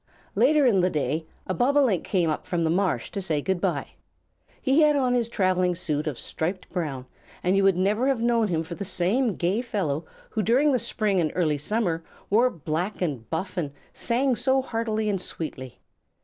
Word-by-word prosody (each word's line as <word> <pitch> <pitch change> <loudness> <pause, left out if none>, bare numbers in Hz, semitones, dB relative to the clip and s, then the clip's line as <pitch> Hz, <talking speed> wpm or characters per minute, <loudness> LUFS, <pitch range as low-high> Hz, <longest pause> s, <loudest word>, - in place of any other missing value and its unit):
Later 300 -2 +4
in 205 -7 +4
the 180 - +3
day, 155 0 -1 0.2
a 185 - -2
Bobolink 250 - +3
came 180 -4 +1
up 155 - -4
from 170 -2 0
the 160 - +2
marsh 175 - 0
to 200 - -3
say 160 -5 0
good 180 +4 -1
by. - - -1 0.7
He 275 +4 +3
had 300 -1 +5
on 255 -3 +2
his 235 -2 +1
travelling 185 -4 +1
suit 155 -3 -2
of 145 -5 -3
striped 180 +4 -3
brown, 145 -8 -3 0.4
and 180 +2 +2
you 195 - +3
would 195 -2 +4
never 210 +7 +2
have 270 -3 +2
known 235 -1 +2
him 165 -4 0
for 165 - -7
the 200 - -5
same 200 +6 +1
gay 185 +7 0
fellow 175 - -2 0.3
who 220 - 0
during 255 +8 +3
the 255 - +2
spring 205 -4 0
and 155 - 0
early 155 -5 +1
summer 170 -1 -1 0.3
wore 235 +5 +5
black 170 - -3
and 140 -11 -3
buff 185 +4 -3
and 145 -5 -2 0.2
sang 250 +2 +1
so 265 +3 +2
heartily 225 -3 -1
and 195 -3 0
sweetly. 130 -8 -6
190 Hz, 195 wpm, -25 LUFS, 165-235 Hz, 0.7 s, had